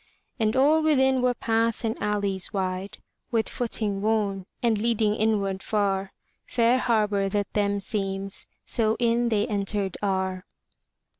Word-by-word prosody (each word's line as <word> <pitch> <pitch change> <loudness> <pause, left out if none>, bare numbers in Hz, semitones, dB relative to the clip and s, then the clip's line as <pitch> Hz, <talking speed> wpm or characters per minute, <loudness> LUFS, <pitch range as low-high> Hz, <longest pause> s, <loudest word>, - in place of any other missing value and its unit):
And 220 +1 +1
all 295 +4 +4
within 265 -4 +3
were 250 0 +2
paths 230 0 0
and 225 0 0
alleys 200 -2 -1
wide. 190 0 -3 0.3
With 225 -2 0
footing 215 -4 -2
worn, 205 -3 0 0.2
and 225 -3 +2
leading 220 -2 +1
inward 205 -3 0
far; 195 -2 0 0.4
Fair 240 +1 +3
harbor 210 -5 +1
that 205 0 -2
them 205 -1 +1
seems, 195 -1 -2 0.2
so 220 -2 +2
in 235 0 +2
they 210 -2 +1
entered 200 -2 -2
are. 190 -2 -1
210 Hz, 135 wpm, -26 LUFS, 195-230 Hz, 0.4 s, all